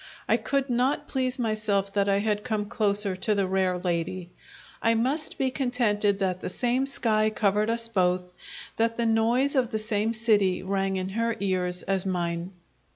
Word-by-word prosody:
I - - +4
could 275 -1 -1
not 250 +3 0
please 255 -1 -1
myself 215 -4 0
that 200 -1 +1
I 195 - +3
had 210 0 -1
come 215 -4 -2
closer 205 -3 0
to 210 +3 0
the 200 -1 +1
rare 185 -1 +1
lady; 175 0 -3 0.5
I 230 0 +3
must 265 +7 0
be 265 -1 0
contented 230 -6 +1
that 185 -2 -1
the - - -3
same 250 +6 0
sky 215 -5 +1
covered 210 0 +1
us 230 0 0
both, 180 -4 +1 0.5
that 230 0 +1
the 235 - +1
noise 235 +5 +2
of 255 -4 +2
the 220 - -2
same 215 +1 0
city 205 -5 +2
rang 195 0 -1
in 185 0 -2
her 230 +3 -1
ears 180 -2 -1
as 190 -1 0
mine. 175 -1 -2
210 Hz, 175 wpm, -26 LUFS, 190-230 Hz, 0.5 s, I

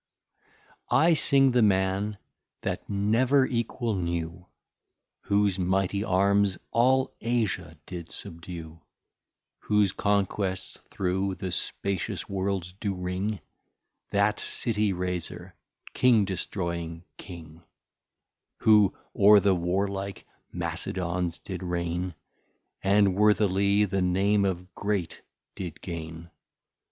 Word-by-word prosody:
I 165 +2 +5
Sing 135 -4 +4
the 125 0 +3
Man 100 0 +1 0.4
that - - -4
never 115 +7 +3
Equal 120 -1 -2
knew, 85 -1 -3 0.8
Whose 100 -2 +2
Mighty 95 +2 0
Arms 100 0 +2
all 130 +3 +3
Asia 105 -8 -1
did 85 -3 -8
subdue, 85 -1 -8 0.8
Whose 105 -2 +2
Conquests 100 -2 -1
through 95 +1 -1
the 95 -2 -5
spacious 95 +1 -1
World 95 -2 -2
do 100 -3 -2
ring, 90 +3 -3 0.7
That 100 +1 +2
City 105 -3 0
Raser, 90 -1 -4 0.4
King 120 -5 +4
destroying 85 -3 -3
King, 85 -3 -11 1.0
Who 105 -3 +5 0.2
o're 105 +1 +7
the 100 -1 +3
Warlike 95 +2 -2 0.3
Macedons 90 -1 -3
did 95 -2 -6
Reign, 90 0 -2 0.7
And 100 0 +4
worthily 100 0 +3
the 95 -1 -1
Name 100 +3 +2
of 90 0 -3
Great 100 -5 -2 0.3
did 90 -5 -7
gain. 80 -1 -7
95 Hz, 100 wpm, -27 LUFS, 90-105 Hz, 1.0 s, o're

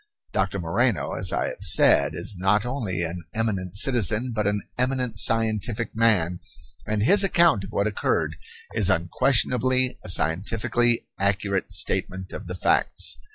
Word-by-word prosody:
Doctor 95 -1 0
Moreno, 90 - 0
as - - -2
I - - -1
have - - -10
said, 80 -5 +4
is 85 +5 -3
not 95 +4 +1
only 110 -9 -3
an 85 +1 -5
eminent 100 -4 -2
citizen, 120 0 +2
but 105 -2 -1
an 105 -1 -1
eminent 125 -4 -1
scientific 115 +1 -1
man, 95 -7 +2 0.5
and 105 -1 0
his 200 - +5
account 170 - +3
of - - -11
what 100 - 0
occurred 105 -1 -1 0.4
is - - +3
unquestionably 125 +7 +1
a - - -6
scientifically 110 +8 +1
accurate 100 0 -1
statement 95 0 -2
of - - -8
the 90 - -5
facts. - - 0
105 Hz, 145 wpm, -24 LUFS, 95-120 Hz, 0.5 s, his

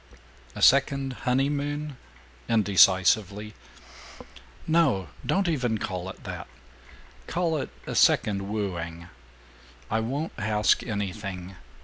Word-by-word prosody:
"A - - -3
second 140 -1 +4 0.2
honeymoon?" 145 +2 -1 0.5
indecisively. 100 0 +3 1.1
"No. 145 - +2
Don't 195 -1 +1
even 125 -9 0
call 95 -2 -4
it - - -11
that. - - -7 0.8
Call 170 -2 0
it 145 - -4 0.2
a - - -5
second 100 -2 +3
wooing. 85 -5 -4 0.8
I 110 - +2
won't 135 +8 -3
ask 105 0 +2
anything. 100 -3 -5
110 Hz, 95 wpm, -26 LUFS, 95-140 Hz, 1.1 s, second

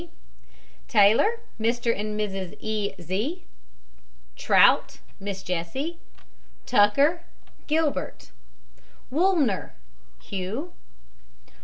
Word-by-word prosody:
G. 345 - -12 0.8
TAYLOR, 225 - +4 0.2
MR. 230 +1 +1
AND 210 0 -3
MRS. 195 -3 -4
E. 210 -2 -2
Z 215 - -3 0.9
TROUT, - - +4 0.2
MISS 195 -1 -5
JESSIE. 220 - -3 0.7
TUCKER, 275 +10 +3 0.5
GILBERT. 310 -1 -1 0.8
WOOLNER, 305 - +1 0.4
HUGH. 200 - -5
220 Hz, 70 wpm, -25 LUFS, 200-305 Hz, 0.9 s, TAYLOR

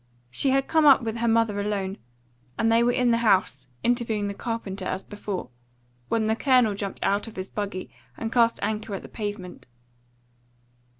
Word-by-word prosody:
She 270 - +2
had 270 0 +2
come 315 -2 +4
up 270 -3 +7
with 225 0 -3
her 235 0 0
mother 225 -3 +2
alone, 200 -2 -2 0.6
and 225 0 +2
they 230 +1 +5
were 240 +1 +3
in 245 -1 +2
the 230 - +3
house, 185 - +2 0.2
interviewing 230 -4 0
the - - -3
carpenter 200 -3 -4
as 185 +1 -3
before, 200 -9 -6 0.6
when 225 -1 +1
the 220 0 +2
Colonel 250 -4 +3
jumped 200 -1 -5
out 200 +3 +1
of 225 - -10
his 185 0 -5
buggy 200 -3 -4 0.3
and 225 0 -4
cast 230 -1 +3
anchor 215 -1 -2
at - - -7
the - - -9
pavement. 205 -4 -6
220 Hz, 180 wpm, -25 LUFS, 200-235 Hz, 0.6 s, up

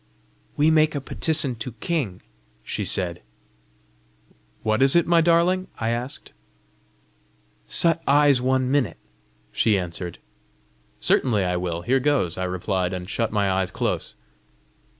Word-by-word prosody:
"We 150 +2 +4
make 155 -1 +3
a - - -1
petisson 140 -1 -1
to 115 +2 -5
king," 115 - -3 0.4
she - - -4
said. 90 -3 -2 1.4
"What 110 +3 0
is 135 +2 +6
it, 170 - +4
my 170 -1 +4
darling?" 175 +3 +2
I 115 - -1
asked. 120 +4 -4 1.4
"Shut 165 -1 +4
eyes 140 -2 +4
one 130 0 +1
minute," 140 -5 0 0.5
she 105 - +2
answered. 90 -1 -5 0.8
"Certainly 110 -6 +2
I 90 0 -1
will! 85 -1 -3
Here 130 +8 +2
goes!" 135 - +1
I 95 - -3
replied, 90 0 -2
and 90 0 -7
shut 115 +2 -2
my 105 -2 +1
eyes 95 -1 0
close. - - -3
120 Hz, 130 wpm, -23 LUFS, 95-145 Hz, 1.4 s, is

